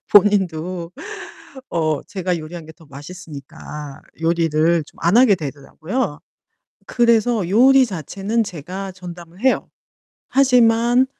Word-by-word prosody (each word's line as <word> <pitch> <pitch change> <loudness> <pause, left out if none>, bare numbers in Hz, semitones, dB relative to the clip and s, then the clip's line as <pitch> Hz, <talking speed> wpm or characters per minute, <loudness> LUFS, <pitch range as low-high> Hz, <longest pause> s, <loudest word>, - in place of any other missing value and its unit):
본인도 185 -4 +3 0.8
어 155 -3 0
제가 185 -3 -2
요리한 160 +1 -8
게 160 - -11
더 160 +1 -20
맛있으니까 145 -1 -10 0.2
요리를 165 0 +2
좀 - - -20
안 170 +6 +3
하게 240 -4 +6
되더라고요. 155 - -4 0.7
그래서 235 -4 +2
요리 260 +6 +6
자체는 200 - -2
제가 190 +1 -7
전담을 175 -1 -11
해요. 260 +2 +1 0.6
하지만 245 -1 +4
180 Hz, 245 characters per minute, -20 LUFS, 160-225 Hz, 0.8 s, 하게